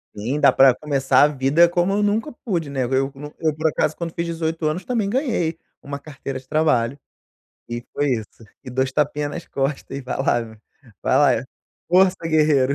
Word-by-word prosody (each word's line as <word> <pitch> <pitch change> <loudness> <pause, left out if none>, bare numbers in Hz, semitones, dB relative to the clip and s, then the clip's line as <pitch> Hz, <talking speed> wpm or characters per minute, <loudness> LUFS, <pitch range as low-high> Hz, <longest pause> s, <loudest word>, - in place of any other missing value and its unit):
Sim, 120 +8 -2
dá - - +6
pra 135 -2 +6
começar 140 0 +2
a - - +7
vida 145 +4 +3
como 175 +2 +1
eu 205 +1 +1
nunca 215 +8 0
pude, 170 -9 -1
né, 135 -3 -1
no 130 - 0
eu 135 +1 0 0.3
eu 155 -2 0
por 160 +1 0
acaso 155 0 0
quando 170 -1 -5
fiz 170 - -2
18 165 -1 -2
anos 165 +4 -1
também 225 -5 -1
ganhei 220 - 0 0.2
uma 140 0 -6
carteira 140 -2 -7
de 130 - -21
trabalho, 140 -5 +1 0.7
e 120 0 -5
foi 145 -1 0
isso, 110 0 -6 0.2
e 125 - -7
dois 130 +1 0
tapinha 150 0 0
nas 170 +4 -7
costas 135 0 -3
e - - -4
vai 130 - -4
lá 125 -3 +1 0.6
vai - - +2 0.3
lá, - - -11 0.4
força 185 +1 +4
guerreiro. 150 -4 +3
150 Hz, 195 wpm, -22 LUFS, 135-170 Hz, 0.7 s, a